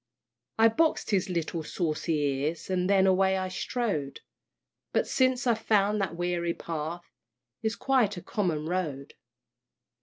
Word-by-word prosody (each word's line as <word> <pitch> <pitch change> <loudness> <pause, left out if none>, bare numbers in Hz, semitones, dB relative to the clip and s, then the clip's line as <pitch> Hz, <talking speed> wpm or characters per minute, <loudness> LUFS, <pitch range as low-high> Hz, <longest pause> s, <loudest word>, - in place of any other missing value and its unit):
I 225 0 +7
box'd 310 +3 +1
his 190 -2 +1
little 170 -1 -2
saucy 160 0 -2
ears, 145 +5 -1
And 180 0 +1
then 195 -1 +5
away 190 0 +3
I 185 0 -2
strode; 185 - -2 0.7
But - - +2
since 255 -1 +1
I've 235 -3 +2
found 210 -1 +2
that 180 -4 -2
weary 175 -1 -1
path 165 +1 -5 0.6
Is 220 0 -1
quite 245 -8 +1
a 175 - -7
common 170 -7 -1
road. 155 -6 -3
185 Hz, 140 wpm, -28 LUFS, 165-210 Hz, 0.7 s, I